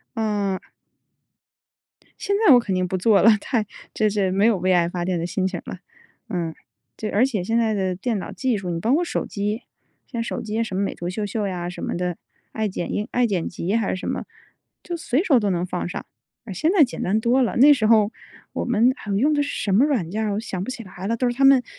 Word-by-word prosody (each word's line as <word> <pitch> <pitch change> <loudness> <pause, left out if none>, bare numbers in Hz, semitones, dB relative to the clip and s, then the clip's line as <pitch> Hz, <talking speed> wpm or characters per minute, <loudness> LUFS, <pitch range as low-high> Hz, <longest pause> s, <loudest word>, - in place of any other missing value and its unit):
嗯。 205 -4 -1 1.6
现 400 0 0
在 285 - +9
我 245 - +8
肯 205 -5 -2
定 185 0 0
不 185 - -2
做 200 +1 +4
了， 220 0 +6
太 225 -2 -1 0.3
这 215 -1 +2
这 200 -2 0
没 200 +3 +2
有 230 -3 +4
为 185 +1 +1
爱 175 -1 +3
发 175 -1 -3
电 180 -1 -1
的 165 - -2
心 190 +1 -1
情 185 -2 -4
儿 - - -16
了， 180 - -7 0.5
嗯。 170 -3 -2 0.4
这 215 - -4
而 225 +6 +3
且 215 -9 -2
现 225 +5 0
在 225 -2 +2
的 190 -3 -1
电 210 +2 -2
脑 - - -6
技 255 -4 0
术， 190 -3 -4
你 170 - -2
包 225 +9 +1
括 330 +5 +3
手 345 - -2
机， 210 +3 -3 0.4
像 235 -4 -4
手 230 - -4
机 220 +1 -1
什 190 -4 -5
么 200 - +1
美 - - -2
图 175 - -5
秀 205 +3 -3
秀 205 0 -2
呀 175 -2 -4
什 180 - -7
么 - - -2
的， 180 -1 -2 0.3
爱 220 -2 -1
剪 175 - -4
映 210 - -2
爱 245 0 +2
剪 190 -6 -1
辑 180 +4 -3
还 225 -4 +1
是 - - 0
什 185 - -6
么， - - -3 0.6
就 350 - -4
随 320 -2 0
手 280 -10 +4
都 205 -3 0
能 175 -1 0
放 180 -1 -3
上， - - -6 0.4
啊， 205 - -6
现 310 - +1
在 370 -6 +6
简 250 - -3
单 205 +4 +1
多 245 +4 +2
了。 240 - 0
那 285 +4 +8
时 230 -6 +1
候， 220 -1 +4 0.4
我 - - -2
们 240 +1 +3
啊， 215 - -10
我 195 - +1
用 290 +8 +3
的 290 - +2
是 285 - -2
什 200 - 0
么 225 +8 +5
软 225 - -1
件 220 +2 -1
儿？ 210 -2 -1
我 205 - -1
想 195 -4 -4
不 255 - -5
起 245 -3 -6
来 185 0 -7
了。 230 +2 0
都 250 +1 +1
是 240 - -1
他 275 - 0
们 270 -2 +7
210 Hz, 280 characters per minute, -23 LUFS, 185-240 Hz, 1.6 s, 在